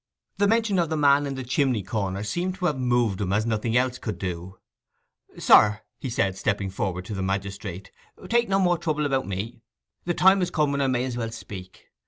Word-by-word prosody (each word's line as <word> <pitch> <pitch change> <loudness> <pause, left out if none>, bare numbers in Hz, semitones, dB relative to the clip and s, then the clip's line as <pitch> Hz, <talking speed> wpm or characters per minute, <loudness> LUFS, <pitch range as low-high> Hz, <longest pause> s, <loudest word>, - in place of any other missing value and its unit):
The 205 - +4
mention 220 -3 +2
of 170 -2 +1
the 160 - -1
man 145 -1 +4
in 135 - -4
the 130 - -5
chimney 125 -3 +1
corner 100 -1 -2
seemed 175 - -2
to 185 -1 -4
have 150 -6 0
moved 120 -5 +1
him 95 -2 -1
as 105 +2 +1
nothing 115 +1 0
else 125 0 0
could 105 -7 -4
do. 90 0 -5 0.8
'Sir,' 105 0 +5 0.2
he 135 - -4
said, 100 -5 0
stepping 100 0 -1
forward 90 -1 -3
to 105 - -6
the 95 - -3
magistrate, 95 -1 -4 0.4
'take 235 -1 +2
no 195 - +3
more 175 -3 +2
trouble 150 -2 -1
about 135 -2 0
me. 100 +5 -5 0.4
The 175 0 -1
time 190 +1 +5
is 180 - 0
come 150 -3 +1
when 140 0 0
I 135 - +2
may 125 -1 +1
as 125 -2 -4
well 115 -2 -2
speak. 95 -5 -10
120 Hz, 215 wpm, -25 LUFS, 100-150 Hz, 0.8 s, Sir